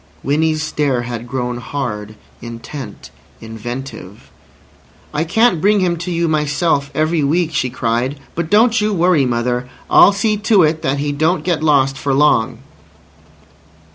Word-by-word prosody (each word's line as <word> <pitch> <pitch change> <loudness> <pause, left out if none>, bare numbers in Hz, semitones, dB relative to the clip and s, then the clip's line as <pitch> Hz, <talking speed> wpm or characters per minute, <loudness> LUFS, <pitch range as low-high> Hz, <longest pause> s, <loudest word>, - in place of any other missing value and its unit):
Winnie's 155 +2 0
stare 145 -6 -1
had 120 -1 -6
grown 125 -1 -3
hard, 110 -5 -5 0.3
intent, 115 - -9 0.3
inventive. 110 - -8 0.8
"I 150 - 0
can't 180 0 +2
bring 205 +2 +3
him 180 -2 +1
to 170 +2 -5
you 170 -1 0
myself 150 -1 0
every 155 0 +1
week," 160 +3 0
she 130 -3 0
cried. 125 +3 -2
"But 170 -1 -3
don't 220 +2 +4
you 210 0 0
worry, 170 -6 +3
mother. 125 +1 -1 0.2
I'll - - +7
see 210 +1 0
to 210 -3 +3
it 155 +1 +1
that 140 -3 -1
he 145 +1 -2
don't 160 +5 0
get 175 -4 -1
lost 135 -3 +2
for 140 -1 0
long." 140 -6 +2
145 Hz, 145 wpm, -17 LUFS, 125-170 Hz, 0.8 s, I'll